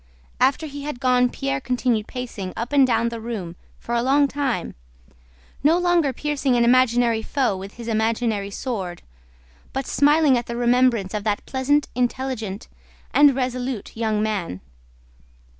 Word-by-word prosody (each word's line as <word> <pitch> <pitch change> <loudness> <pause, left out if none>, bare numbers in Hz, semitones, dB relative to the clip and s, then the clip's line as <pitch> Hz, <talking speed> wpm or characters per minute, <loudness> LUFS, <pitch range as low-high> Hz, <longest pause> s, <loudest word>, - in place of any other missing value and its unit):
After 275 +4 +2
he 285 -1 -7
had 290 -3 -5
gone 250 -1 +3
Pierre 275 +1 -3
continued 245 -3 0
pacing 230 -7 -6
up 235 +5 -4
and 275 -2 +5
down 230 -1 +1
the 230 -1 -6
room 205 -7 -5 0.2
for 235 - -6
a 235 - +2
long 280 +3 +3
time, 270 -9 -2 0.9
no 315 +4 +5
longer 350 -5 +2
piercing 280 -1 -1
an 240 - +3
imaginary 240 -2 +3
foe 255 -3 0
with 195 +2 -8
his 235 -1 -9
imaginary 220 -2 0
sword, 195 -5 -5 0.7
but 270 0 -2
smiling 290 -2 +4
at 240 - -8
the 235 - -4
remembrance 240 -5 +2
of 210 -1 -2
that 210 -1 -1
pleasant, 285 +2 +1
intelligent, 245 -5 -2 0.5
and 290 -2 +6
resolute 255 -3 -3
young 220 -2 0
man. 195 - -3
245 Hz, 150 wpm, -22 LUFS, 220-270 Hz, 0.9 s, and